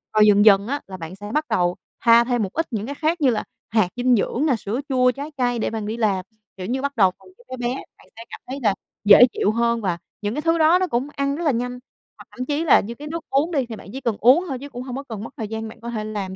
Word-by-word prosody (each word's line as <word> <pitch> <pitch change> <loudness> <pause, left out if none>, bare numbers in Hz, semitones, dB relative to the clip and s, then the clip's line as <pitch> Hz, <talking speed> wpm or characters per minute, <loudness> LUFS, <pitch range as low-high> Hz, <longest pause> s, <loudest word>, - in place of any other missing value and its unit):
rồi 215 - +6
dần 205 +1 +5
dần 200 0 +6
á 285 +2 -2
là 190 - -8
bạn 165 +1 -8
sẽ 205 +1 -8
bắt 305 +1 +1
đầu 175 0 +1 0.3
pha 235 0 +7
thêm 240 -2 0
một 190 - -5
ít 325 - -1
những 215 -1 -3
cái 285 +2 -5
khác 320 +2 -1
như 270 - +5
là 225 - 0 0.3
hạt 215 -5 +2
dinh 245 0 +3
dưỡng 245 +7 0
nè, 270 -6 +3
sữa 220 +3 -4
chua 255 -1 +3
trái 285 +5 -7
cây 245 -2 0
để - - 0
bạn 220 -2 -4
đi 220 +2 -4
làm, 200 -5 0 0.3
kiểu 185 - -6
như, 260 +2 -1
bắt 280 -1 -3
đầu 190 -5 +4
bằng - - -19
thứ 485 - -20
bé 255 - -6
bé, 250 - -1 0.2
bạn - - -21
sẽ 230 - -10
cảm - - -9
thấy 265 +2 -5
là 205 -3 +3 0.3
dễ 205 +4 +9
chịu 205 - +1
hơn 235 0 +1
và 180 -4 -1 0.2
những 205 +2 -2
cái 300 - -2
thứ 330 +1 +2
đó 325 +3 +5
nó 370 - 0
cũng 245 +1 -1
ăn 280 0 -1
rất 345 - -4
là 295 - +3
nhanh. 245 +1 -3 0.4
Hoặc - - -13
thậm 255 0 -5
chí 295 +3 -1
là 290 - +6
như 235 +4 -6
cái 295 +3 -9
nước 330 +1 -5
uống 295 +6 +1
đi, 275 -6 0
thì 230 - -7
bạn 210 - -12
chỉ 270 - -6
cần 230 -4 -1
uống 270 - +5
thôi 260 -2 -3
chứ 285 +1 -9
cũng 245 -1 -7
hông 255 -1 -6
có 275 - -5
cần 220 -6 -7
mất - - -9
thời 220 - -4
gian, 220 +1 -5
bạn 230 +1 -14
có 235 - -6
thể 220 -3 -3
làm 205 -3 -5
240 Hz, 310 wpm, -22 LUFS, 215-280 Hz, 0.4 s, dễ